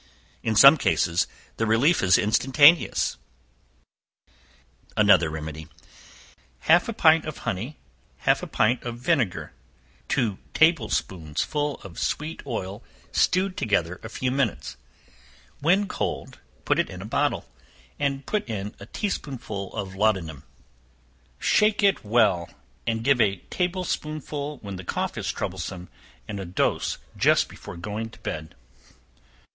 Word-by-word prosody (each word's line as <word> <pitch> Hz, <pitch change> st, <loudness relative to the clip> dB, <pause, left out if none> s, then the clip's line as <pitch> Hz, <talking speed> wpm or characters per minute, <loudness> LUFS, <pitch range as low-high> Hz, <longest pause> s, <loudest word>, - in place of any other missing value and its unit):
In 110 Hz, -, -1 dB
some 140 Hz, +7 st, +9 dB
cases 85 Hz, -, +1 dB, 0.3 s
the 115 Hz, -, 0 dB
relief 130 Hz, +10 st, +3 dB
is 95 Hz, -1 st, +5 dB
instantaneous. 145 Hz, +9 st, +4 dB, 1.8 s
Another 95 Hz, -6 st, +5 dB
Remedy. 80 Hz, 0 st, -6 dB, 0.9 s
Half 175 Hz, +7 st, +4 dB
a -, -, -2 dB
pint 160 Hz, -5 st, +4 dB
of 155 Hz, -, -5 dB
honey, 115 Hz, +11 st, -3 dB, 0.5 s
half -, -, +4 dB
a -, -, -5 dB
pint 120 Hz, +4 st, +1 dB
of 120 Hz, -1 st, -5 dB
vinegar, 125 Hz, -, 0 dB, 0.5 s
two 105 Hz, -5 st, 0 dB, 0.2 s
table 160 Hz, -8 st, +4 dB
spoonsful 95 Hz, -, -2 dB
of 95 Hz, -5 st, -9 dB
sweet 155 Hz, +2 st, -2 dB
oil 100 Hz, -3 st, -4 dB, 0.3 s
stewed 185 Hz, +1 st, +2 dB
together 90 Hz, -5 st, 0 dB
a 110 Hz, -, -8 dB
few 125 Hz, +3 st, -2 dB
minutes; 130 Hz, -5 st, -1 dB, 0.8 s
when 185 Hz, +7 st, +3 dB
cold -, -, -4 dB, 0.3 s
put -, -, +2 dB
it -, -, +1 dB
in -, -, -8 dB
a -, -, -8 dB
bottle, -, -, 0 dB, 0.5 s
and 140 Hz, -1 st, -1 dB
put 210 Hz, -, -2 dB
in 105 Hz, -2 st, -4 dB
a 100 Hz, -, -10 dB
tea 205 Hz, -, -2 dB
spoonful 110 Hz, -, -5 dB
of 100 Hz, -3 st, -4 dB
laudanum; 95 Hz, -8 st, 0 dB, 1.0 s
shake 210 Hz, -1 st, +2 dB
it 200 Hz, -1 st, +3 dB
well, 105 Hz, -6 st, +2 dB, 0.4 s
and 115 Hz, 0 st, -1 dB
give 135 Hz, -1 st, +4 dB
a 100 Hz, -3 st, +3 dB, 0.2 s
table 180 Hz, +1 st, -1 dB
spoonful 150 Hz, -3 st, -4 dB
when 100 Hz, -2 st, -6 dB
the 90 Hz, -, -8 dB
cough -, -, -2 dB
is -, -, -2 dB
troublesome, 90 Hz, -1 st, -5 dB, 0.4 s
and 100 Hz, -, -5 dB
a 95 Hz, -, -5 dB
dose 90 Hz, -, 0 dB, 0.2 s
just -, -, +3 dB
before -, -, -10 dB
going 105 Hz, +5 st, -4 dB
to -, -, -16 dB
bed. 80 Hz, 0 st, -5 dB
115 Hz, 135 wpm, -25 LUFS, 95-150 Hz, 1.8 s, some